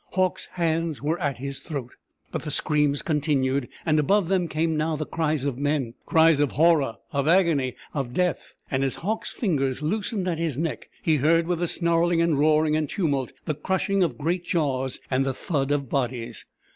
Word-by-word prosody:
Hauck's 185 -1 0
hands 165 -3 0
were 155 +4 -1
at 145 -6 -1
his 140 +2 -5
throat. 135 -5 -6 0.4
But - - -3
the 155 - -5
screams 150 0 +1
continued, 140 -4 +1 0.2
and 155 -2 +3
above 195 +4 +2
them 185 -3 +2
came 160 +1 0
now 155 +1 0
the 155 +1 -3
cries 155 -3 -1
of 135 -3 -2
men 145 -5 0
cries 160 -2 +5
of 145 -2 +1
horror, 150 -5 +3 0.2
of 140 -2 0
agony, 160 -8 +3 0.2
of 135 -5 -2
death; 180 0 -1 0.2
and 135 0 +1
as 135 - 0
Hauck's 220 +2 -1
fingers 145 - -1
loosened 200 +3 -1
at 165 -3 -1
his 160 -6 -1
neck 160 +1 -3
he 155 -2 +3
heard 165 +4 +3
with 175 -1 -1
the 175 - 0
snarling 170 0 +2
and 165 -4 +2
roaring 155 0 +3
and 155 -2 0
tumult 140 -9 -1
the 155 - 0
crushing 190 +5 0
of 175 - +1
great 170 +4 -1
jaws 135 -7 -1
and 130 +1 +2
the 135 -1 -2
thud 140 -4 -1
of 145 -2 0
bodies. 120 -4 -3
155 Hz, 190 wpm, -25 LUFS, 140-170 Hz, 0.4 s, cries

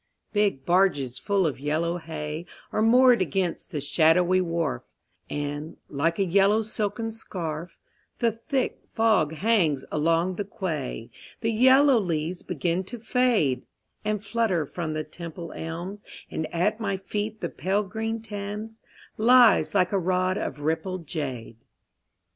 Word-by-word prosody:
Big 205 -11 +1
barges 170 -9 +2
full 200 -3 +1
of 150 -5 -1
yellow 160 +4 -1
hay 160 0 -5 0.2
Are - - 0
moored 245 +1 +6
against 185 -2 -1
the 155 -6 -3
shadowy 175 +5 +3
wharf, 165 - -1 0.5
And, 145 +2 -4
like 165 +4 0
a 195 - +2
yellow 200 +4 +4
silken 220 +1 -2
scarf, 170 -6 -6 0.4
The 235 -1 +2
thick 245 +4 -2 0.2
fog 220 -9 +3
hangs 165 -6 +1
along 165 +4 +1
the 205 - -1
quay. 165 - -4 0.3
The 225 - +1
yellow 260 +3 +6
leaves 170 -2 -2
begin 175 +2 -1
to 240 - -7
fade 225 - +2 0.4
And 210 0 -2
flutter 200 -7 +1
from 160 +1 -4
the 155 0 -2
Temple 170 +2 -8
elms, 175 +5 -6 0.3
And 160 - -3
at 205 +6 +1
my 200 -3 -1
feet 210 +3 -4
the - - -3
pale 195 +3 0
green 225 +3 -4
Thames 210 +1 -6 0.4
Lies 240 -1 +5
like 180 -2 +3
a 200 - +2
rod 185 +1 +1
of 145 -6 -4
rippled 165 +3 -2
jade. 130 -8 -5
185 Hz, 140 wpm, -26 LUFS, 160-215 Hz, 0.5 s, moored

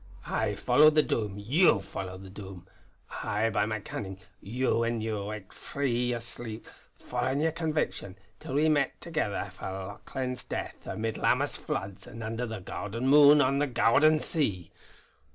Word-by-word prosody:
I - - -1
followed 155 +1 +5
the 155 - +6
Doom; 105 -7 -1
you 125 - +4
followed 95 -1 -7
the 95 - -11
Doom. 95 -3 -9 0.6
I 110 +2 0
by 105 0 +1
my 110 0 -2
cunnin'; 95 -2 -6 0.2
you 125 +4 0
when 115 0 0
ye 110 0 -2
waked 105 -1 -5
frae 140 0 -4
yer 120 0 0
sleep, 115 -1 -8 0.3
followin' 140 - -1
yer 160 +1 +2
conviction, 155 - -2 0.2
till 130 - -6
we 150 +2 +4
met 145 -3 +2
thegither 130 - -2
for - - -9
Lauchlane's 100 +7 -5
death, - - -6
amid 110 0 -3
Lammas - - +2
floods 100 0 -5
and 115 +1 -8
under 115 +3 -3
the 110 -3 -5
gowden 110 +6 -4
moon 145 +1 +8
on 140 +1 +2
the 145 - +2
gowden 145 +5 +4
sea. 100 - -2
115 Hz, 160 wpm, -29 LUFS, 100-140 Hz, 0.6 s, moon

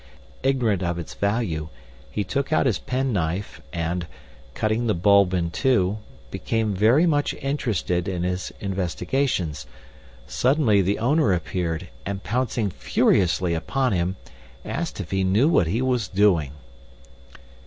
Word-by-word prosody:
Ignorant 120 -8 +1
if 85 -1 -1
its 85 - -6
value, 100 -7 -1 0.4
he 105 +9 -2
took 140 - -2
out 155 - +3
his 115 -8 +1
penknife 105 -8 -2
and, 85 +1 -2 0.5
cutting 110 +2 0
the 110 - +2
bulb 100 +1 +4
in 85 -2 -1
two, 105 -2 +1 0.3
became 110 -2 -1
very 115 - +4
much 145 -4 +1
interested 110 - -1
in 90 -3 -2
his 90 +1 -2
investigations. 90 - -2 0.6
Suddenly 125 -6 +2
the 95 +2 0
owner 130 - +2
appeared 85 -1 -2
and, 100 +2 -4
pouncing 115 -2 -1
furiously 90 0 +2
upon 130 +10 0
him, 90 0 0 0.5
asked - - -4
if - - -6
he 95 0 +1
knew 100 +9 +3
what 145 - +3
he 110 +10 0
was 125 -5 0
doing. 95 -8 +2
100 Hz, 130 wpm, -24 LUFS, 90-120 Hz, 0.6 s, bulb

